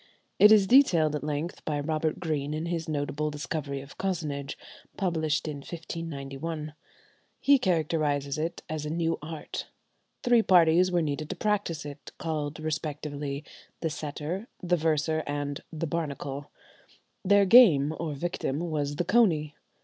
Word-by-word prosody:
It 210 - +9
is 210 -3 +7
detailed 175 - +5
at 150 - -4
length 150 +3 -3
by 150 -2 -1
Robert 155 +1 -1
Greene 150 -3 -2
in 155 +2 -3
his 170 -2 -3
"Notable 150 0 -1
Discovery 145 -2 -4
of 140 +1 -14
Cozenage," 150 -7 -3 0.4
published 160 -6 0
in 150 -2 -4
1591. 155 -1 -6 0.7
He 280 -1 +5
characterizes 155 - 0
it 165 +2 -3
as 155 -1 -4
a 150 - -4
new 165 +1 0
art. 155 0 -6 0.6
Three 240 -1 +5
parties 180 -2 +5
were 175 -2 +2
needed 150 0 -3
to 190 - -3
practise 200 -6 -1
it, 145 0 -9
called 155 -2 -3
respectively 150 -2 -4 0.4
the 160 - -1
"setter," 155 +7 -4
the 180 0 +1
"verser," 160 -1 +1
and 145 -1 -3
the 160 +1 -3
"barnacle;" 145 -3 -4 0.7
their 200 +1 +5
game, 175 - +7
or 155 -3 -3
victim, 145 -3 -2
was 150 -3 -2
the 175 - -1
"coney." 170 -8 +3
155 Hz, 140 wpm, -28 LUFS, 145-170 Hz, 0.7 s, It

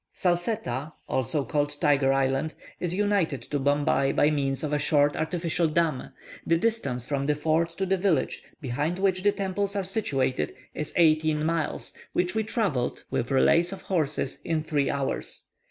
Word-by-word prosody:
Salsetta 175 - -1
(also 135 +3 0
called 145 -1 -1
Tiger 140 -3 +3
Island) 135 +3 0 0.2
is 175 0 -1
united 195 - +1
to 145 - -2
Bombay 140 0 +2
by 150 - +3
means 135 -2 -1
of 150 -1 -2
a 150 - +2
short 145 0 +3
artificial 165 +1 0
dam. 155 -4 0 0.3
The 165 - +2
distance 175 - -1
from 140 0 -2
the 150 - +2
fort 160 +3 +1
to 195 - 0
the 190 +1 +1
village, 180 -7 +1 0.2
behind 145 +5 -2
which 190 -1 +1
the 205 +1 +4
temples 200 0 -2
are 200 - 0
situated, 165 - -1 0.2
is 150 - -4
eighteen 155 -2 +3
miles, 165 -1 -2 0.2
which 180 0 +1
we 220 - +1
travelled, 195 - -1
with 120 - -1
relays 165 +6 +4
of 195 - -7
horses, 155 -6 -1
in 160 -2 -1
three 145 -3 0
hours. 140 -1 -3
155 Hz, 165 wpm, -27 LUFS, 145-180 Hz, 0.3 s, the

